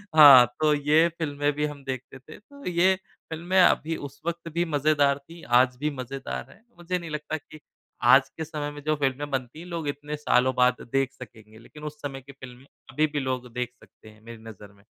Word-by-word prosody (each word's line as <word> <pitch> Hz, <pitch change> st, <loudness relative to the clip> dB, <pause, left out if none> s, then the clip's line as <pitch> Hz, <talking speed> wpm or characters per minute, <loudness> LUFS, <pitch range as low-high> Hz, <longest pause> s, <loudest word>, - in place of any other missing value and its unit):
हाँ, 140 Hz, -5 st, +10 dB
तो 155 Hz, -1 st, +3 dB
ये 150 Hz, +3 st, +3 dB
फ़िल्में 145 Hz, -2 st, 0 dB
भी 150 Hz, +1 st, -1 dB
हम 145 Hz, -2 st, -7 dB
देखते 130 Hz, 0 st, -6 dB
थे। 145 Hz, +4 st, -13 dB
तो 280 Hz, +6 st, -16 dB
ये 180 Hz, +2 st, +3 dB, 0.4 s
फ़िल्में 175 Hz, +4 st, 0 dB
अभी 165 Hz, -2 st, +3 dB
उस 135 Hz, -, -23 dB
वक़्त 170 Hz, 0 st, -4 dB
भी 170 Hz, +1 st, +1 dB
मज़ेदार 145 Hz, -2 st, +2 dB
थीं, 165 Hz, 0 st, -12 dB
आज 125 Hz, +1 st, +4 dB
भी 150 Hz, +2 st, 0 dB
मज़ेदार 125 Hz, -, -6 dB
हैं। 210 Hz, -, -20 dB
मुझे 175 Hz, +1 st, -2 dB
नहीं 170 Hz, -1 st, -8 dB
लगता 150 Hz, +1 st, -4 dB
कि 155 Hz, +1 st, -15 dB, 0.4 s
आज -, -, +6 dB
के 160 Hz, -, -3 dB
समय 150 Hz, -2 st, -5 dB
में 145 Hz, 0 st, -10 dB
जो 155 Hz, +1 st, +1 dB
फ़िल्में 140 Hz, 0 st, -2 dB
बनती 130 Hz, +2 st, -4 dB
हैं, 170 Hz, -, -9 dB
लोग 170 Hz, -3 st, -4 dB
इतने 145 Hz, +1 st, -4 dB
सालों 130 Hz, -3 st, +2 dB
बाद 125 Hz, 0 st, +3 dB
देख 135 Hz, -1 st, +1 dB
सकेंगे, 110 Hz, -3 st, -14 dB
लेकिन 150 Hz, +6 st, -14 dB
उस 150 Hz, -, -25 dB
समय 135 Hz, -2 st, -6 dB
की 135 Hz, +2 st, -13 dB
फ़िल्में 130 Hz, -1 st, -13 dB, 0.3 s
अभी 155 Hz, +3 st, +2 dB
भी 150 Hz, -1 st, -3 dB
लोग 130 Hz, -2 st, -3 dB
देख 125 Hz, 0 st, -3 dB
सकते 110 Hz, -, -18 dB
हैं, 110 Hz, 0 st, -19 dB
मेरी 115 Hz, -1 st, -11 dB
नज़र 105 Hz, -2 st, -12 dB
में। 100 Hz, 0 st, -24 dB
145 Hz, 210 wpm, -26 LUFS, 130-155 Hz, 0.4 s, हाँ